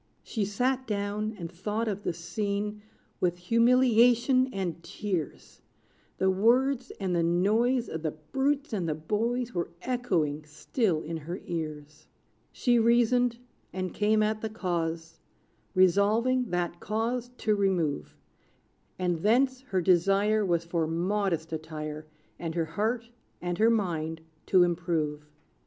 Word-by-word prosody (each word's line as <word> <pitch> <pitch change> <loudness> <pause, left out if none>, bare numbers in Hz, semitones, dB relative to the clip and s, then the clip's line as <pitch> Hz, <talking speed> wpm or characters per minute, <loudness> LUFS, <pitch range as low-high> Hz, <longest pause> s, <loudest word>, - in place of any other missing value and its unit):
She 215 -4 -2
sat 255 +6 0
down, 210 +1 -2
and 170 -2 -6
thought 210 +6 -2
of 205 -2 -2
the - - -1
scene 205 +5 -3 0.4
With 175 -1 +1
humiliation 245 +4 +4
and 180 -6 -3
tears: 185 -8 -5 0.6
The 190 0 +3
words, 250 +6 +2
and 185 -3 -1
the 170 - +2
noise 215 +9 +2
Of 160 - -5
the 160 - -1 0.2
brutes 275 0 0
and 180 -6 -1
the 155 - 0
boys 230 +9 -1
Were 175 -1 -2
echoing 175 - 0
still 160 - -1
in 165 +1 -4
her 170 +4 -6
ears. 155 -3 -6 0.4
She 240 -2 +2
reasoned, 235 +1 +3 0.3
and 185 -1 -4
came 215 +1 +2
at 215 0 0
the 220 - -2
cause, 165 -5 -3 0.6
Resolving 215 +7 +3
that 175 -1 -2
cause 230 +3 -2
to 215 - +1
remove; 180 - 0 0.8
And 180 -2 0
thence, 255 +7 +2
her 195 -9 -1
desire 195 +4 +3
Was 170 -3 0
for 170 -2 -1
modest 170 -1 -1
attire, 155 -1 -5 0.3
And 165 -1 -4
her 165 -1 +1
heart 225 +8 -2 0.3
and 175 +1 -3
her 225 +1 +5
mind 165 -7 -1 0.3
to 185 -2 +6
improve. 165 -4 -1
195 Hz, 135 wpm, -28 LUFS, 170-230 Hz, 0.8 s, to